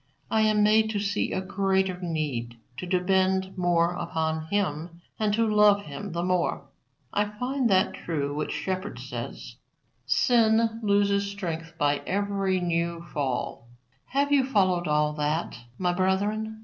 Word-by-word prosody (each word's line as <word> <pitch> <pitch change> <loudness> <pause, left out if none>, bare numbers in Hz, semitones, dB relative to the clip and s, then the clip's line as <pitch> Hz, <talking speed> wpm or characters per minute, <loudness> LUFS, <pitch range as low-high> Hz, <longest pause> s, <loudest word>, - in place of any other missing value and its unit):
I 220 - +3
am 215 -1 +3
made 220 +1 +4
to 210 -2 -1
see 205 +1 -1
a 190 - -1
greater 190 -1 0
need 145 -9 -3 0.2
to 180 - -5
depend 190 +1 +1
more 175 -1 +2
upon 160 -2 -2
Him 170 -3 -2 0.2
and 215 -1 +1
to 230 +1 +2
love 210 -1 +5
Him 155 +6 -7
the 170 +1 -2
more. 180 -4 0 0.5
I 205 - +2
find 250 +4 -1
that 190 0 +3
true 145 -4 -3
which 150 +1 -3
Shepard 190 +2 -3
says, - - -7 0.5
'sin 225 -1 +3
loses 200 -1 +2
strength 165 -5 -5
by 145 -1 +2
every 195 -1 0
new 170 -1 -1
fall.'" 130 -4 -3 0.4
Have 280 +2 0
you 280 -2 +5
followed 185 -9 +1
all 150 0 +2
that, 150 +2 -1 0.2
my 180 -1 0
brethren? 205 +4 0
190 Hz, 145 wpm, -26 LUFS, 165-205 Hz, 0.5 s, love